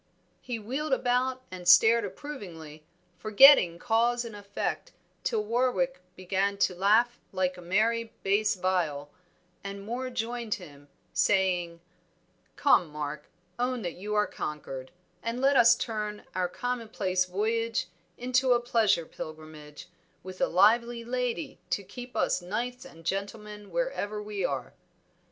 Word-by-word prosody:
He 245 -2 -4
wheeled 265 +7 -3
about 255 0 +1
and 180 -1 -8
stared 220 +7 +7
approvingly, 180 - -8 0.4
forgetting 215 -5 +7
cause 240 +2 +1
in 230 - -7
effect 205 -1 -4 0.3
till 220 -3 0
Warwick 255 +2 0
began 195 +2 -1
to 190 - +2
laugh 215 +6 +3
like 185 -1 0
a 180 - -11
merry 225 +6 +1
bass 205 +2 +2
viol, 170 -6 -1 0.5
and 200 0 -7
Moor 250 +4 -3
joined 235 -2 -2
him, 145 -6 -13 0.3
saying 180 -2 +1 0.7
"Come, 270 - +4
Mark, 150 0 -5 0.3
own 250 -1 -1
that 175 -2 -3
you 210 +3 -4
are 210 0 +3
conquered, 135 -3 -6 0.3
and 230 +2 -3
let 275 +2 +3
us 240 -2 +7
turn 210 -2 -4
our 180 -1 0
commonplace 215 -5 -1
voyage 225 +5 -1 0.3
into 255 +1 +2
a 240 - +3
pleasure 225 -8 +2
pilgrimage, 155 -2 -10 0.4
with 185 0 -9
a 265 - +4
lively 235 +5 +3
lady 245 -5 -3
to 200 - -1
keep 245 +6 -10
us - - +1
knights 245 +8 -4
and 165 -9 -14
gentlemen 210 +2 -4
wherever 215 - -2
we 210 -2 -4
are." 135 -6 -2
210 Hz, 135 wpm, -28 LUFS, 180-240 Hz, 0.7 s, stared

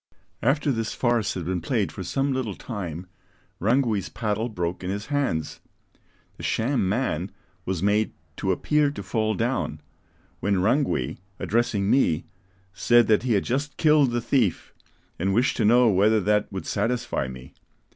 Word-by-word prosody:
After 140 +3 +2
this 115 -3 -2
farce 120 -4 +1
had 90 -3 -4
been 90 0 -2
played - - 0
for - - -8
some 135 0 0
little 120 -7 -2
time, 90 -7 -6 0.6
Rangui's 115 -1 +1
paddle 110 +1 -2
broke 90 -3 -3
in 90 - -3
his 100 +2 -3
hands. 110 - -1 0.8
The - - -10
sham 115 -4 0
man 100 -6 -1 0.4
was 95 -2 -2
made 105 +2 +2 0.2
to 95 - 0
appear 150 +9 +2
to 140 -8 -7
fall 110 +3 0
down, 115 - -1 0.6
when 100 0 +1
Rangui, 110 - +1 0.2
addressing 110 -3 0
me, 100 - +2 0.5
said 120 +5 +4
that 110 - +4
he 120 -1 0
had 100 - +2
just 140 +3 -2
killed 150 -4 +4
the 120 0 -1
thief, 115 -6 0 0.5
and 95 +3 +1
wished 125 +3 +2
to 110 - +2
know 120 +3 +6
whether 105 +3 +4
that 105 +1 +1
would 95 - -5
satisfy 115 - -1
me. 65 0 -10
110 Hz, 155 wpm, -25 LUFS, 95-125 Hz, 0.8 s, know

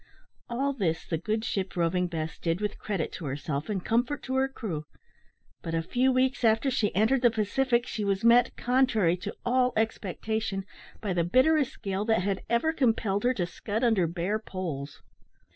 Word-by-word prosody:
All 270 +4 0
this 165 -10 -1
the 160 - -2
good 215 +5 -2
ship 195 -3 -2
Roving 180 +1 +1
Bess 160 -2 -4
did 165 +1 -1
with 210 -1 -3
credit 195 -7 -2
to 165 - -7
herself 140 +4 -3
and 195 -4 -2
comfort 245 +5 0
to 260 - -4
her 265 0 +2
crew; 195 - -5 0.8
but 165 0 -3
a 165 - 0
few 250 +9 +2
weeks 255 0 +1
after 225 +4 +3
she 225 -4 0
entered 225 +6 +3
the 240 - +6
Pacific, 235 +3 +1
she 215 - -4
was 195 0 0
met, 235 +1 +5
contrary 240 -8 +2
to 200 +3 -6
all 250 0 +2
expectation, 220 -1 -2 0.4
by 200 -4 -1
the 175 -1 +1
bitterest 265 - +2
gale 195 +1 -1
that 220 -4 +2
had 195 0 -1
ever 235 +8 +2
compelled 225 -7 +1
her 250 - +4
to 180 - 0
scud 210 +6 -4
under 220 -8 +3
bare 180 +6 -1
poles. 160 -9 -6
215 Hz, 180 wpm, -28 LUFS, 180-245 Hz, 0.8 s, the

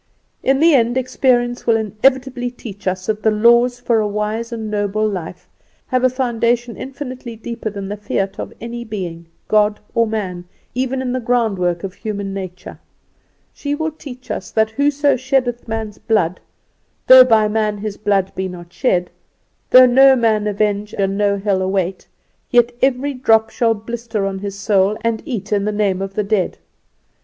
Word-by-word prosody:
"In 270 0 +2
the 330 +1 +5
end 240 -1 +3
experience 250 -1 +1
will 230 - +5
inevitably 245 +4 0
teach 215 -5 -10
us 185 0 -1
that 215 +1 -2
the 220 - +3
laws 235 +3 +4
for 235 -2 +1
a 215 - +1
wise 210 +3 -3
and 220 -2 -5
noble 210 +1 0
life 180 -2 -6 0.4
have 255 0 +1
a 255 - +5
foundation 240 -2 0
infinitely 255 -3 -7
deeper 225 0 -5
than 200 -1 -6
the 205 - -4
fiat 195 -1 -3
of - - -5
any 235 +1 -6
being, 180 -7 -6 0.2
God 210 0 +2
or 230 -1 +2
man, 185 -5 -4 0.3
even 260 +1 -1
in 250 -1 -2
the 255 - -1
groundwork 210 -8 0
of 190 -1 -5
human 200 -2 -5
nature. 185 -2 -7 0.7
"She 290 0 -3
will 315 +1 -2
teach 265 -4 -10
us - - -4
that 220 0 +1
whoso 285 +2 +2
sheddeth 255 -2 -1
man's 220 -2 -4
blood, 185 -6 0 0.7
though 260 0 +10
by 220 -4 +4
man 210 -1 0
his 205 0 -5
blood 195 -2 0
be 190 0 -3
not 175 -1 -10
shed, 180 -9 0 0.6
though 255 0 +9
no 265 +2 +6
man 220 -3 +1
avenge 210 0 -1
and 195 0 0
no 200 0 +1
hell 195 -1 0
await, 190 -1 -2 0.4
yet 240 -1 +4
every 270 +2 +1
drop 225 -3 +2
shall 230 -2 +1
blister 225 -1 -4
on 195 -1 -3
his 200 0 -6
soul 200 0 +2
and 230 -1 -1
eat 215 - -3
in 200 -1 +1
the 210 - 0
name 200 -3 0
of 195 0 -5
the 210 - 0
dead. 200 -3 0
220 Hz, 175 wpm, -18 LUFS, 200-245 Hz, 0.7 s, though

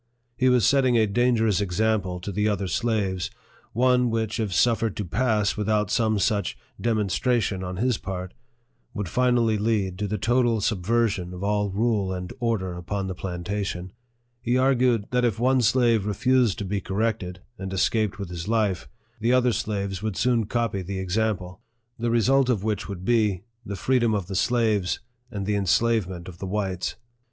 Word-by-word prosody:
He 130 +2 +3
was 125 -5 +4
setting 130 -3 +4
a 110 - +4
dangerous 110 -2 +2
example 100 -1 0
to 100 - -5
the 105 +2 +1
other 100 -2 -1
slaves, 100 -2 -1 0.4
one 125 +1 +3
which, 110 0 -1
if 110 -3 -1
suffered 115 +2 +2
to 105 - -2
pass 105 +2 +1
without 105 -1 0
some 110 -2 +2
such 100 -1 0 0.2
demon 110 -3 +1
stration 110 -1 0
on 90 0 -4
his 120 +2 +1
part, 95 -1 -5 0.6
would 105 -3 -3
finally 120 -1 +2
lead 100 -4 0
to 105 - -1
the 105 +2 -2
total 120 +2 +2
sub 105 -3 -1
version 100 -4 0
of 90 - -7
all 105 0 +1
rule 105 -1 0
and 90 -1 -5
order 110 -7 -1
upon 95 +3 -4
the 95 - -3
plantation. 90 0 -4 0.5
He 120 +1 +1
argued 130 -4 +3
that 125 0 +2
if 115 -3 +1
one 130 +1 +3
slave 115 -3 +3
refused 125 0 +2
to 100 - -4
be 100 +1 -2
corrected, 95 -3 -2 0.2
and 95 0 -5
escaped 105 +2 +1
with 100 -3 -6
his 85 0 -6
life, 105 -5 0 0.3
the 115 +2 +1
other 125 -1 +3
slaves 100 -3 -2
would 110 -3 -3
soon 120 -4 +2
copy 115 -4 -1
the 95 +2 -5
example; 95 -1 -2 0.4
the 120 +1 0
result 130 +3 +3
of 110 -6 +1
which 105 -1 -2
would 95 -2 -6
be, 105 -5 +2 0.2
the 100 -3 -5
free 130 +7 +1
dom 115 -2 +2
of 100 -3 -2
the 95 +2 -6
slaves, 110 -4 +1 0.3
and 100 -2 -4
the 105 - 0
enslavement 100 -2 +1
of 90 -2 -10
the 95 - -5
whites. 95 -2 -2
Mr. - - -25
105 Hz, 180 wpm, -25 LUFS, 95-115 Hz, 0.6 s, was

